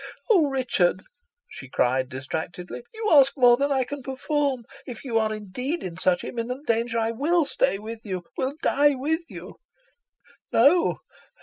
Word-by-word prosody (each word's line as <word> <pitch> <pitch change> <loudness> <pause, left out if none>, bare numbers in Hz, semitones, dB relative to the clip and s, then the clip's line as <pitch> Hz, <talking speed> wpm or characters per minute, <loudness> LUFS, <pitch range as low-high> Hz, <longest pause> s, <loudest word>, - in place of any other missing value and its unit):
"Oh! 345 -9 +5
Richard," 235 -9 +1 0.4
she 135 - -11
cried 130 0 +1
distractedly; 160 - -6
"you 440 -1 -3
ask 275 -2 +6
more 245 -2 +7
than 280 +3 0
I 265 -2 +2
can 285 +3 -7
perform. 270 -1 -2 0.2
If 245 -4 -8
you 230 -3 +1
are 220 -1 0
indeed 250 - -4
in 175 -3 -5
such 180 -1 +1
imminent 250 +4 -5
danger, 230 0 0
I 225 0 +1
will 310 +7 +1
stay 270 -6 +1
with 220 +2 -7
you 185 -4 -4
will 265 +2 -2
die 290 0 +3
with 310 +6 -1
you." - - -10 0.9
"No! 335 +4 +4
250 Hz, 160 wpm, -25 LUFS, 215-285 Hz, 0.9 s, more